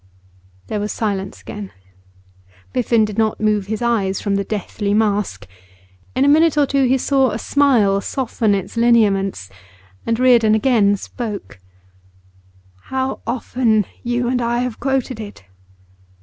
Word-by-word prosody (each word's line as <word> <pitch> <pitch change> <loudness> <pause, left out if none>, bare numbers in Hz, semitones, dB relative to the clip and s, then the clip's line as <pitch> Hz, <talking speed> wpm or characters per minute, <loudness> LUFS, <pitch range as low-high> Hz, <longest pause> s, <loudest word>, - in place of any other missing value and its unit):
There 215 - -3
was 210 +1 -3
silence 195 -3 -3
again. 205 -2 -8 1.0
Biffen 235 -3 +2
did 210 0 -5
not 220 -1 +1
move 210 -2 +1
his 220 +2 -3
eyes 200 -5 0
from 200 - -2
the 200 0 0
deathly 205 0 -3
mask; 210 - 0 0.7
in 260 +2 +3
a - - +3
minute 310 +1 +4
or 290 - +5
two 275 -1 +1
he 260 +1 +3
saw 265 0 +2
a 215 - -3
smile 230 -8 +2
soften 225 -3 -1
its 195 -2 -5
lineaments, 200 - +2 0.5
and 230 0 -1
Reardon 235 -4 +5
again 215 -4 +3
spoke: 210 - -7 1.3
'How 265 0 -2
often 230 -3 +1 0.2
you 240 0 -1
and 250 0 0
I 235 0 0
have 250 -3 -4
quoted 265 -3 -1
it! 205 - -9
225 Hz, 140 wpm, -19 LUFS, 205-250 Hz, 1.3 s, or